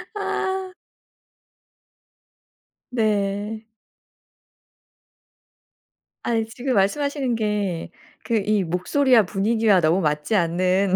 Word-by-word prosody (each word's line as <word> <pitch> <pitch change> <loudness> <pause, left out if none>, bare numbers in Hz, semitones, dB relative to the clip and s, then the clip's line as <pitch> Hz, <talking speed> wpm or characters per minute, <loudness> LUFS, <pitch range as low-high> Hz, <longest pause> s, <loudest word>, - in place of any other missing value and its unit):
아. 380 -2 -2 2.2
네. 210 -1 -1 2.6
아니 225 -2 0
지금 250 +3 -3
말씀하시는 265 +5 +1
게 210 -6 -2 0.4
그 230 - +2
이 210 -1 +1
목소리와 225 - +3
분위기와 205 +1 +2
너무 165 +4 +2
맞지 150 +6 0
않는 185 +2 +2
210 Hz, 155 characters per minute, -23 LUFS, 185-235 Hz, 2.6 s, 목소리와